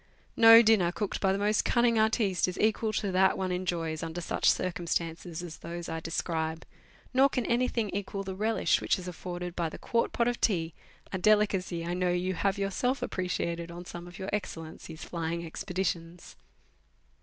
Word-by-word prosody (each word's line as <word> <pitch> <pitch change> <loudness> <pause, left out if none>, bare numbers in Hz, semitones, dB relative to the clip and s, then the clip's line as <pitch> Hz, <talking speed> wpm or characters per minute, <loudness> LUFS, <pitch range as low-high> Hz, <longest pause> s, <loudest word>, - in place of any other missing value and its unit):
No 225 0 +9
dinner 210 -6 +4
cooked 205 +2 -3
by 190 - +3
the 195 - +1
most 205 +1 +2
cunning 235 -2 +3
artiste 220 -5 +2
is 180 - -5
equal 220 0 +2
to 200 -2 -1
that 190 +1 +3
one 185 -1 -1
enjoys 170 -3 -2
under 165 +1 -4
such 170 - +1
circumstances 170 -1 -2
as 165 -3 -8
those 170 0 -6
I 165 - -3
describe, 160 -1 -3 0.5
nor 265 +2 +5
can 250 -3 -2
anything 235 -3 0
equal 195 0 -3
the 190 -1 -5
relish 210 -6 +1
which - - +1
is 185 -1 -8
afforded 180 0 -6
by 170 -2 -1
the - - -9
quart 230 0 0
pot 235 - +1
of 245 -1 -1
tea, 165 -6 +1 0.4
a 190 - -1
delicacy 195 -4 +2
I 175 - -2
know 180 0 0
you 180 +1 0
have 195 +2 0
yourself 225 +7 -1
appreciated 170 -2 -2
on 175 +1 -8
some 175 0 -8
of 175 +1 -11
your 190 0 -5
Excellency's 165 -4 -5
flying 170 0 -3
expeditions. 170 0 -4
180 Hz, 180 wpm, -29 LUFS, 170-210 Hz, 0.5 s, No